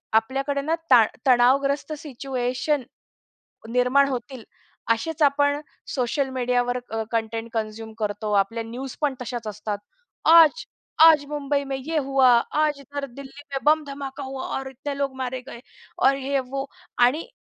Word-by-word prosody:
आपल्याकडे 270 +5 +1
ना 315 +4 0 0.2
ताण 230 -4 +8 0.2
तणावग्रस्त 275 +4 +3
सिच्युएशन 260 0 -2 0.9
निर्माण 250 +3 +3
होतील 250 -1 -5 0.5
असेच 315 +8 -1
आपण 285 0 +3 0.3
सोशल 265 +2 0
मीडियावर 245 0 +1
अ, 225 0 -1
कंटेंट 225 0 -2
कन्झ्युम 220 0 -4
करतो. 210 0 -2
आपल्या 205 +4 +1
न्यूज 250 +4 -7
पण 290 -3 +1
तशाचं 240 -3 -4
असतात. 210 0 -4 0.5
आज 330 +8 +7 0.4
आज 320 -3 +8
मुंबई 285 -1 -1
में 270 -1 -4
ये 310 +5 -3
हुआ. 270 -2 +4 0.2
आज 300 -1 +1
इधर 285 +1 -6
दिल्ली 280 +2 -10
में 270 - 0
बम्ब 305 0 +4
धमाका 275 0 -6
हुआ 265 0 -6
और 270 0 -5
इतने 275 +2 -6
लोग 275 -1 -2
मारे 255 0 -3
गए. 235 - -9 0.4
और 275 - +4
ये 275 +1 -1
वो 275 0 -2 0.4
आणि 290 +7 0
270 Hz, 145 wpm, -24 LUFS, 245-285 Hz, 0.9 s, ताण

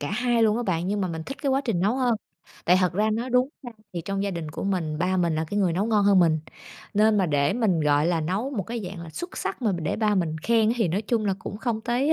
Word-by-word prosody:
cả 145 - -3
hai 240 +1 +1
luôn 215 0 +3
á 240 - -1
bạn, 175 -4 -1
nhưng 205 0 0
mà 185 - 0
mình 160 -1 -4
thích 275 - -5
cái 275 - +1
quá 270 +1 +2
trình 205 -8 0
nấu 210 +7 +1
hơn. 250 -3 +2 0.5
Tại 180 +2 +5
thật 180 -1 +2
ra 215 +4 +1
nói 235 +4 -2
đúng 250 +2 +3
ra 245 - -8 0.2
thì 175 - -3
trong 195 +1 -2
gia 200 - -1
đình 170 -4 -5
của 155 - -5
mình, 165 -6 -1
ba 185 +2 +1
mình 170 -3 +1
là 160 - -1
cái 205 - -1
người 185 -4 +2
nấu 195 +6 0
ngon 210 -3 +2
hơn 200 -2 +5
mình. 160 -3 +4 0.6
Nên 210 0 +4
mà 185 - +2
để 145 0 +2
mình, 205 -8 +1
gọi 150 +1 +3
là, 170 -2 +1
nấu 190 - -2
một 220 -8 -2
cái 235 +4 -5
dạng 180 -1 -7
là 165 - -9
xuất 350 - -7
sắc - - -4
mà 215 - +2
để 165 -4 -2
ba 215 -2 +2
mình 165 -4 0
khen 230 -1 +3
thì 220 -7 +1
nói 195 +6 -1
chung 220 0 0
là 195 - +1
cũng 200 - -6
không 225 -2 -2
tới 250 +7 +1
200 Hz, 295 wpm, -25 LUFS, 170-230 Hz, 0.6 s, Tại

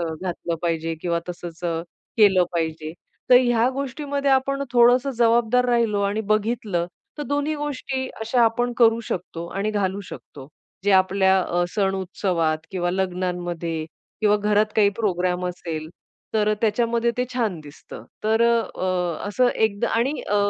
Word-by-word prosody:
अ, 170 - 0 0.2
घातलं 175 -2 -3
पाहिजे 165 -1 -1
किंवा 170 -1 -1
तसच 175 -1 -7
अ, 165 -1 -1 0.4
केलं 195 -5 +5
पाहिजे. 160 -2 -3 0.4
तर 250 - +9
ह्या 240 -1 +3
गोष्टीमध्ये 280 +1 -2
आपण 275 +1 +1
थोडस 245 +2 +5
जबाबदार 235 +1 +3
राहिलो 230 -4 +2
आणि 200 +2 0
बघितलं 215 -5 -1 0.3
तर - - -2
दोन्ही 290 +2 -1
गोष्टी 275 -3 -3
अशा 235 +2 +2
आपण 240 +2 +2
करू 230 -1 +5
शकतो 170 -2 -4
आणि 205 +2 0
घालू 200 -2 -1
शकतो. 135 -2 -11 0.4
जे 205 - +3
आपल्या 190 0 +4
अ, 175 0 0
सण 195 -2 +1
उत्सवात 175 -4 -1
किंवा 175 -2 -1
लग्नांमध्ये 175 -3 -2 0.4
किंवा 210 -1 +4
घरात 210 +1 +2
काही 210 -2 +5
प्रोग्राम 180 -4 0
असेल 165 -3 -5 0.5
तर 215 0 +2
त्याच्यामध्ये 235 +2 +1
ते 250 - +1
छान 215 -9 -1
दिसतं. 150 0 -12 0.2
तर 220 +1 +3
अ, 235 0 +4 0.2
अ, 180 -1 -1
असं 250 +4 +2
एकदा 210 -2 +1
आणि 265 +6 0
अ, 205 - +2
205 Hz, 150 wpm, -23 LUFS, 175-235 Hz, 0.5 s, तर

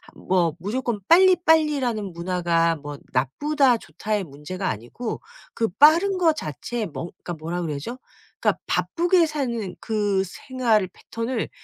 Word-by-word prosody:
뭐 175 -4 +1
무조건 225 +3 -2
빨리 370 +2 +7
빨리라는 285 - +1
문화가 170 -1 +1
뭐 145 -1 -8
'나쁘다. 255 - +2
좋다.'의 210 -2 -3
문제가 175 +6 -5
아니고 120 - -5 0.3
그 225 - 0
빠른 315 - +5
거 340 -3 +4
자체 220 - -4
뭐 155 -3 -6
그러니까 175 - -8
뭐라 165 +3 -4
그래야죠? 160 - -4 0.4
그러니까 - - +1
바쁘게 350 0 +2
사는 235 -10 -3
그 205 -3 0
생활 225 -1 0
패턴을 230 +5 -4
215 Hz, 300 characters per minute, -24 LUFS, 170-275 Hz, 0.4 s, 빨리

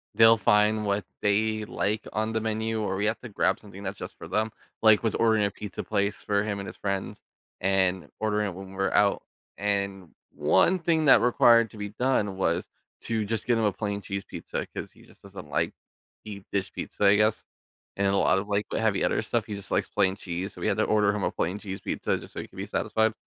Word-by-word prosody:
they'll 115 0 +7
find 105 +1 +3
what 100 -1 0 0.2
they 110 +1 +1
like 105 +1 -2
on 110 +1 -1
the 110 - 0
menu, 110 0 -1
or 100 -2 -1
we 100 +2 -1
have 110 +2 0
to 125 - -9
grab 95 -2 +1
something 100 -2 -12
that's 100 +1 -4
just - - -8
for - - -9
them, 110 +1 0 0.3
like, 110 -1 +6
with 110 -2 0
ordering 110 -2 +4
a 100 - -1
pizza 105 -2 -6
place 100 -1 0
for 100 0 0
him 100 -2 -3
and 100 - -6
his - - -9
friends, 100 -1 -3 0.4
and 95 -1 +1
ordering 105 -1 0
it 90 - -7
when 95 0 -9
we're 95 0 0
out, 105 -1 +3 0.3
and 100 -2 -2 0.2
one 185 - +3
thing 160 -2 +1
that 140 - +7
required 115 -1 +5
to - - -12
be 105 0 -4
done 105 -3 0
was 85 -2 0 0.3
to 110 -2 -1
just 110 +1 -2
get 120 - +3
him 115 - +1
a 105 - +2
plain 100 0 -3
cheese 100 0 -4
pizza, - - -5
'cause - - -5
he - - -20
just - - -19
doesn't - - -10
like - - 0 0.5
deep 100 -2 -8
dish 100 -2 -1
pizza, 105 - -3
I 100 +1 +7
guess, 105 +1 +2 0.5
and 100 - +1
a 100 - +2
lot - - +3
of 100 +2 -2
like 105 0 0
heavy 110 -3 +1
other - - +1
stuff, 110 0 -1
he 105 - -5
just 100 -1 -6
likes - - +1
plain 95 0 +2
cheese, 95 0 -5
so - - -11
we - - 0
had 100 - +1
to 110 - +3
order 105 -1 +3
him 105 - -2
a - - +1
plain 90 +4 -2
cheese 95 -2 -6
pizza - - -1
just - - -11
so - - -4
he - - -9
could - - -18
be - - -3
satisfied. 110 0 +1
105 Hz, 235 wpm, -27 LUFS, 100-110 Hz, 0.5 s, they'll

